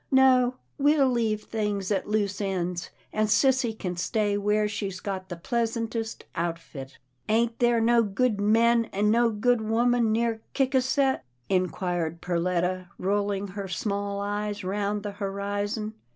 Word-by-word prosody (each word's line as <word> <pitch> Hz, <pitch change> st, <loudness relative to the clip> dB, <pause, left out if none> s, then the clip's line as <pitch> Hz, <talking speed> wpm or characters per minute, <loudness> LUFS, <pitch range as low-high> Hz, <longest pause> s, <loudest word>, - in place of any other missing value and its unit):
No, 255 Hz, -2 st, +5 dB, 0.2 s
we'll 290 Hz, -1 st, +4 dB
leave 220 Hz, -3 st, 0 dB
things 210 Hz, -3 st, -2 dB
at 195 Hz, -, 0 dB
loose 205 Hz, -2 st, 0 dB
ends, 180 Hz, -3 st, -2 dB, 0.2 s
and 215 Hz, 0 st, +1 dB
sissy 260 Hz, +1 st, +3 dB
can 180 Hz, -4 st, -3 dB
stay 205 Hz, +3 st, 0 dB
where 210 Hz, +1 st, +1 dB
she's 200 Hz, -3 st, -4 dB
got 190 Hz, -1 st, -5 dB
the 175 Hz, -, -4 dB
pleas 230 Hz, +6 st, -1 dB
antest 225 Hz, -1 st, -4 dB
outfit." 165 Hz, -5 st, -5 dB, 0.2 s
" 125 Hz, -, -21 dB
Ain't 230 Hz, +1 st, +1 dB
there 240 Hz, -1 st, +3 dB
no 235 Hz, +1 st, +4 dB
good 215 Hz, +1 st, 0 dB
men 230 Hz, +2 st, +4 dB
an' 210 Hz, 0 st, +1 dB
no 235 Hz, +1 st, +4 dB
good 230 Hz, +2 st, +1 dB
women 230 Hz, +1 st, +2 dB
near 225 Hz, 0 st, 0 dB
Ciscasset? 265 Hz, 0 st, +2 dB, 0.2 s
" 125 Hz, -1 st, -42 dB
inquired 175 Hz, -3 st, -1 dB
Perletta, 180 Hz, +1 st, -1 dB
rolling 200 Hz, +1 st, -1 dB
her 195 Hz, +1 st, -5 dB
small 200 Hz, +1 st, -2 dB
eyes 205 Hz, 0 st, -3 dB
round 205 Hz, +2 st, -1 dB
the 205 Hz, -, -3 dB
horizon. 205 Hz, +2 st, -3 dB
210 Hz, 150 wpm, -27 LUFS, 195-230 Hz, 0.2 s, No